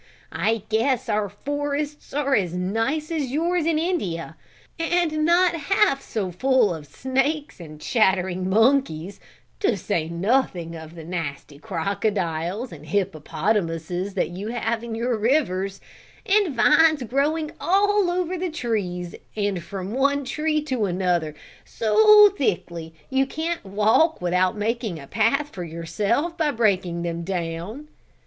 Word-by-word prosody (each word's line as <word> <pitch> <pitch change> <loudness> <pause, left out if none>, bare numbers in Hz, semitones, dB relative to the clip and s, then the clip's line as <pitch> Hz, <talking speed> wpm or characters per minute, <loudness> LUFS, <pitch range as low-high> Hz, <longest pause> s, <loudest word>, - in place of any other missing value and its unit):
I 225 -2 0
guess 235 +3 +1
our 210 -1 0
forests 290 +6 -4
are 280 -1 0
as 180 -7 +1
nice 225 - -1
as 300 -6 -1
yours 335 +3 0
in 325 -2 +2
India, 305 - -2 0.4
and 330 -2 +1
not 345 +2 +4
half 335 -1 +2
so 195 -5 -3
full 255 0 +2
of 155 -3 -8
snakes 270 - -1
and 155 -3 -10
chattering 185 -3 +1
monkeys, 205 - +2 0.4
to 245 - +1
say 165 -2 -2
nothing 175 -2 0
of 160 0 -10
the 165 - -9
nasty 150 -4 -5
crocodiles 190 - -2
and - - -11
hippopotamuses 175 0 -1
that 185 - 0
you 185 +4 -6
have 230 0 -2
in 235 -1 -5
your 235 +1 0
rivers; 195 -6 +1 0.5
and 395 -7 +2
vines 305 +2 +5
growing 295 +6 0
all 405 +1 +3
over 360 0 -1
the 365 0 -1
trees 195 - -3 0.2
and 200 -4 -1
from 195 +3 -6
one 280 +2 +1
tree 305 +3 0
to 255 -7 -1
another, 175 -4 0 0.3
so 420 - +6
thickly 170 - -2 0.2
you 265 0 +2
can't 325 +4 -3
walk 215 - +2
without 180 +2 +1
making 220 -4 -2
a 140 - -10
path 275 - +1
for 180 -10 -7
yourself 200 - -1
by 315 -2 +2
breaking 190 -8 +1
them 170 -1 -3
down." 180 - -4
220 Hz, 135 wpm, -24 LUFS, 180-295 Hz, 0.5 s, so